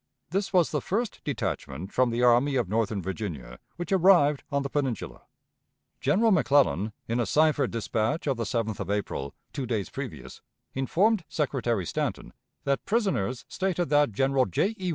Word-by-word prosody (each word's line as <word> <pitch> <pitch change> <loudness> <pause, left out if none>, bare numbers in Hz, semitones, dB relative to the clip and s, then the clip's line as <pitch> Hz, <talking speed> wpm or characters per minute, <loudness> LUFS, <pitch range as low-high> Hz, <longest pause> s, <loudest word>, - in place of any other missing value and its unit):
This 195 +2 -1
was 180 -4 +3
the 150 - -1
first 220 - -2
detachment 95 - -4
from 130 -1 +3
the 120 +1 0
Army 125 +4 +4
of 120 -6 +1
Northern 105 -1 -1
Virginia 85 - -5 0.2
which 175 +4 -6
arrived 175 -6 +5
on 140 0 0
the 140 - -3
Peninsula. 135 -8 -3 0.7
General 225 +3 +3
McClellan, 135 - +3
in 115 +2 -1
a 120 - 0
cipher 150 -3 +3
dispatch 115 +5 -1
of 140 -3 +1
the 115 - -2
7th 110 -1 -2
of - - -4
April, 100 -9 -3 0.2
two 135 -3 -3
days 110 -5 -2
previous, - - -7 0.3
informed 185 - +2
Secretary 120 - -1
Stanton - - -3 0.3
that 140 -1 0
prisoners 130 - 0
stated 180 -4 -1
that 145 -3 +4
General 135 +3 +2
J. 190 - 0
E. 185 -1 -2
135 Hz, 160 wpm, -27 LUFS, 110-160 Hz, 0.7 s, arrived